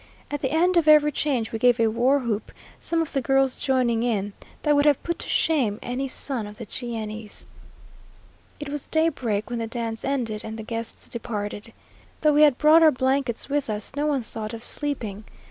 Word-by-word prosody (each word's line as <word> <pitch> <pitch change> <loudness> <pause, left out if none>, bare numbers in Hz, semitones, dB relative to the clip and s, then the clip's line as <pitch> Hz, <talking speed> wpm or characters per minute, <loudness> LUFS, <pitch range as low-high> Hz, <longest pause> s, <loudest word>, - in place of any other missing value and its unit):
At 290 -1 -3
the 265 - 0
end 345 +5 +2
of 330 -2 +3
every 300 -1 +6
change, 260 -6 -1
we 225 - -3
gave 245 0 +4
a 230 - +4
war 240 +5 +3
whoop, 235 -6 -3 0.3
some 330 -1 0
of 320 - -9
the 275 - +1
girls 270 0 +2
joining 255 -4 +1
in, 205 -4 -1 0.3
that 295 -1 +3
would 285 0 +3
have 290 -3 +3
put 340 - -3
to - - -4
shame 255 -11 +1
any 255 +2 -3
son 255 -4 -2
of 210 0 -11
the 230 - -7
Cheyennes. 220 -3 -6 1.1
It 295 -1 -6
was 290 -1 -4
daybreak 260 -10 0
when 240 - -2
the 225 - -3
dance 230 -1 -4
ended 235 -6 -2
and 220 0 -6
the 220 - -6
guests 230 +1 -5
departed. 210 -2 -5 0.5
Though 305 -1 +4
we 295 - +4
had 290 -4 +6
brought 315 +2 +6
our 320 - +8
blankets 260 -2 0
with 285 -3 -1
us, 210 +4 -2
no 295 +1 0
one 280 -4 0
thought 220 0 -6
of 225 - -10
sleeping. 230 -10 -3
250 Hz, 200 wpm, -24 LUFS, 225-290 Hz, 1.1 s, our